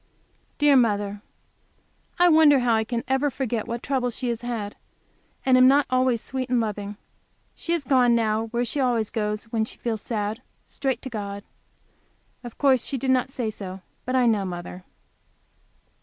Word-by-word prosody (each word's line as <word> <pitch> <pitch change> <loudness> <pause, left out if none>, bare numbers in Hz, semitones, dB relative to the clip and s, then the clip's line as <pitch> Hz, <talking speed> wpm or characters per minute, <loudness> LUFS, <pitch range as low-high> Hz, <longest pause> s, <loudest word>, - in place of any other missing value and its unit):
Dear 290 -1 +5
mother! 205 -4 +1 1.0
I 355 +1 +5
wonder 315 -3 +6
I 230 -2 +2 0.2
ever 265 +2 +1
forget 240 -5 -3
what 235 0 -4
troubles 255 -4 -1
she 250 - -2
has 235 -1 -3
had, 230 -4 -4 0.7
and 255 -1 +5
am 255 - +7
not 280 +2 +5
always 255 -2 +2
sweet 260 -1 -4
and 250 -1 +2
loving. 210 -2 -4 0.6
She 335 - -3
has 335 -4 -1
gone 250 -3 +4
now, 220 -1 0
where 235 +2 -1
she 280 - -3
always 240 -5 +1
goes 210 -1 -2
when 225 -2 +1
she 220 - -6
feels 225 -3 -3
sad, 215 +1 -3 0.2
straight 270 -2 -3
to 260 - -5
God. 200 -2 -5 1.0
Of 240 -2 -9
course 265 -4 +3
she 275 - -1
did 265 +1 0
not 255 0 +2
say 240 -4 -3
so, 190 -2 -7 0.2
but 255 - -2
I 255 -1 +4
know 220 -4 +2
mother. 180 0 -7
240 Hz, 170 wpm, -24 LUFS, 215-260 Hz, 1.0 s, am